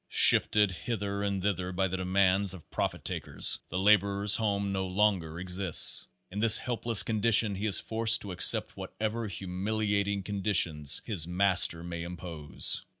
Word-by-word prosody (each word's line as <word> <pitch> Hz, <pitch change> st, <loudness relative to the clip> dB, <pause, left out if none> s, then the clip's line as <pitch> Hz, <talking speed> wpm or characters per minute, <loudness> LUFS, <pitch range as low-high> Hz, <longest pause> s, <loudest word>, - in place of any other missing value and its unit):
Shifted 105 Hz, -2 st, +4 dB
hither 100 Hz, +1 st, -6 dB
and 100 Hz, -2 st, -4 dB
thither 95 Hz, -3 st, -3 dB
by 95 Hz, +1 st, -2 dB
the 95 Hz, +1 st, -5 dB
demands 95 Hz, +1 st, 0 dB
of 85 Hz, -, -17 dB
profit -, -, -5 dB
takers, -, -, +1 dB
the 90 Hz, -, -6 dB
laborer's 100 Hz, +1 st, +2 dB
home 100 Hz, -2 st, -3 dB
no 95 Hz, -1 st, -4 dB
longer 90 Hz, -4 st, -2 dB
exists. 90 Hz, -1 st, +3 dB, 0.2 s
In 100 Hz, -, -7 dB
this 115 Hz, +1 st, +7 dB
helpless 120 Hz, -3 st, +1 dB
condition 110 Hz, -1 st, +1 dB
he 100 Hz, +3 st, -5 dB
is 100 Hz, -, +3 dB
forced 115 Hz, 0 st, 0 dB
to 100 Hz, -, -8 dB
accept 90 Hz, -, +4 dB
whatever 110 Hz, +1 st, -6 dB
humiliating 100 Hz, +1 st, -4 dB
conditions 90 Hz, -8 st, 0 dB
his 85 Hz, -7 st, -2 dB
master 90 Hz, -2 st, 0 dB
may 85 Hz, -1 st, -8 dB
impose. 85 Hz, -3 st, -2 dB
100 Hz, 150 wpm, -27 LUFS, 90-105 Hz, 0.2 s, this